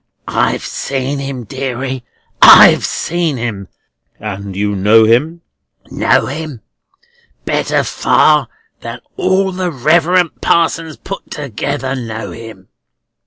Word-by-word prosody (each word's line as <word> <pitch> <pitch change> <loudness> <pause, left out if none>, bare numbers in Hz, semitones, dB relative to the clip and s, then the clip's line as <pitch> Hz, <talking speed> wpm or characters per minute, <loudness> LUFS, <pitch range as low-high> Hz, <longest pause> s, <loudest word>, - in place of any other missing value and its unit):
"I've - - 0
seen 135 +1 -3
him, 135 -2 -5
deary; 130 +1 -5 0.4
I've - - +8
seen 165 -4 -2
him!" 110 -5 -5 0.5
"And 100 -2 -6
you 105 +1 -1
know 105 +4 +4
him?" 150 +10 +1 0.5
"Know - - +2
him! 145 -4 -6 0.8
Better - - 0
far - - +2 0.3
than - - -8
all 195 - +1
the 185 -1 -2
Reverend 170 +5 +1
Parsons 165 -1 0
put 195 - -8
together 140 0 -4
know 115 -3 -6
him." 110 -5 -11
135 Hz, 110 wpm, -15 LUFS, 115-160 Hz, 0.8 s, I've